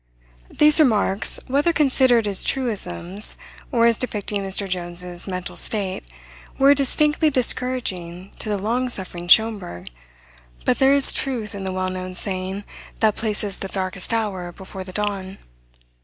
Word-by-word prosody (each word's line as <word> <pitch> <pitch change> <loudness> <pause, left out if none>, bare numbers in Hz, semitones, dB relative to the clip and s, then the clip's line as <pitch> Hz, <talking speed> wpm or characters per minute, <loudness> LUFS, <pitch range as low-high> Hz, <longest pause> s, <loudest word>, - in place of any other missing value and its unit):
These 300 +1 +5
remarks, 215 -8 +2
whether 285 +5 +1
considered 260 -7 +2
as 195 -2 +2
truisms 205 - +1 0.3
or 235 -3 +3
as 230 -1 +3
depicting 210 -4 -2
Mr. 195 +1 0
Jones's 175 0 -5
mental 185 -1 -5
state, 195 -4 +1 0.5
were 275 +1 +6
distinctly 295 +3 +1
discouraging 230 - 0
to 215 - -5
the 205 - -1
long 235 +6 -1
suffering 180 -5 -4
Schomberg; 200 - +2 0.7
but - - +1
there 270 +1 +5
is 280 - +7
truth 240 -6 -3
in 195 -1 -6
the 190 - -3
well 185 0 -2
known 185 0 -6
saying 190 +1 -5 0.3
that 215 -2 +2
places 210 -3 -3
the 195 - -5
darkest 190 -1 -3
hour 200 -6 -2
before 190 +1 -10
the 185 - -10
dawn. 195 -1 -4
205 Hz, 140 wpm, -21 LUFS, 185-245 Hz, 0.7 s, is